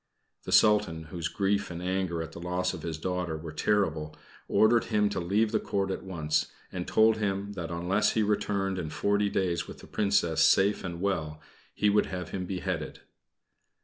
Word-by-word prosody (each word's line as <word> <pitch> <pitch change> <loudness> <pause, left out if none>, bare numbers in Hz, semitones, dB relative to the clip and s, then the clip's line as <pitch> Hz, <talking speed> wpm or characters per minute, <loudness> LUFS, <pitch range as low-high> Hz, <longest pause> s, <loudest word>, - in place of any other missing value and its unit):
The - - -5
Sultan, 105 -7 +4
whose 85 -2 -2
grief 100 0 0
and 85 -1 -6
anger 90 -2 -1
at 80 - -9
the 85 - -9
loss 90 +1 -1
of 90 - -7
his 80 -1 -4
daughter 90 -1 -2
were 80 0 -7
terrible, 80 -3 0 0.3
ordered 115 +2 +4
him 105 -2 +2
to - - -2
leave 105 +5 +1
the - - +2
Court 95 -1 -1
at - - -3
once, 80 -5 -1 0.2
and 90 -1 -4
told 110 0 +4
him 100 -1 -2
that 90 -4 -5
unless 90 +5 +1
he 110 - +2
returned 100 -2 0
in 80 -4 -4
forty 100 +5 +1
days 90 -4 -1
with - - -9
the - - -13
Princess 95 -6 +1
safe 100 +2 +4
and 85 -2 -5
well, 80 -6 -1 0.4
he 105 - +2
would 105 0 +3
have 90 -1 -5
him 90 -2 -4
beheaded. 90 -4 -4
95 Hz, 185 wpm, -29 LUFS, 85-100 Hz, 0.4 s, Sultan